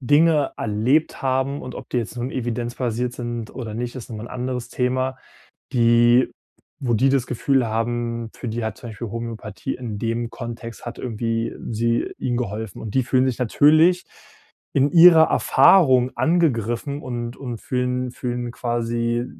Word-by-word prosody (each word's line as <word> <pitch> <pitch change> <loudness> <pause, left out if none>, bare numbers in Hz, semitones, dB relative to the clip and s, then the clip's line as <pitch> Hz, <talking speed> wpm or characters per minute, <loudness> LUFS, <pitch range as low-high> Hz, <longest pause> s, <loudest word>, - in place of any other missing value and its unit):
Dinge 145 +2 +3
erlebt 115 +9 +1
haben- 135 +1 0
und 130 - -7
ob - - -9
die 125 - +1
jetzt 115 +1 -5
nun 125 +2 -3
evidenzbasiert 120 0 -2
sind 120 -2 -5
oder 115 -5 -6
nicht, 120 +1 -4
ist 125 - -8
noch 110 - -5
mal 110 - -7
'n - - -9
anderes 125 -1 -4
Thema- 130 +1 -1 0.6
die 120 +1 +4 0.5
wo 120 -3 0
die 125 +5 +3
das 135 -2 +2
Gefühl 130 +1 +1
haben, 115 +1 -2
für 120 - -6
die 115 +1 -3
hat 110 -1 -4
zum 120 - -9
Beispiel 115 +1 -6
Homöopathie 115 -3 -5
in 115 -5 -6
dem 115 0 -2
Kontext 115 0 -8
hat 120 - -7
irgendwie 115 -1 -2 0.2
sie 115 +1 0
ihnen 120 -1 -1
geholfen. 110 -3 -4
Und 105 -2 -6
die 130 - +3
fühlen 130 +1 +2
sich 130 -2 -1
natürlich 155 +8 +4 0.7
in 140 +1 +3
ihrer 165 -2 +8
Erfahrung 130 -4 +5
angegriffen 140 -4 0
und 120 -2 -5
und 120 -4 -6
fühlen 125 0 -1
fühlen 120 -1 -4
quasi, 120 0 -1
120 Hz, 160 wpm, -22 LUFS, 115-130 Hz, 0.7 s, ihrer